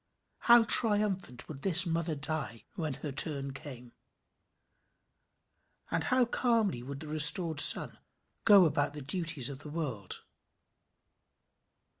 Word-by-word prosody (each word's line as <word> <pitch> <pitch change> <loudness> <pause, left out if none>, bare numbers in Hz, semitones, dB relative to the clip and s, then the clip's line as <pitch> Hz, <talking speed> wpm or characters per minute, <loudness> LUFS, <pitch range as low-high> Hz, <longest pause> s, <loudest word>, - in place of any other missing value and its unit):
How 235 -1 +4
triumphant 205 - +1
would 140 -3 -11
this 180 0 +3
mother 165 -1 -3
die, 140 -6 -6
when 155 -5 -5
her 145 - -4
turn 140 -1 -1
came! 125 -3 -11 2.0
And - - -2
how 255 -1 +1
calmly 230 - -1
would 140 +3 -9
the 155 - -9
restored 155 +1 +3
son - - +4 0.4
go 200 -4 +5
about 145 -2 -2
the 150 - -9
duties 155 -3 -2
of 140 -1 -8
the 150 - -11
world. 135 - -7
155 Hz, 120 wpm, -29 LUFS, 140-185 Hz, 2.0 s, go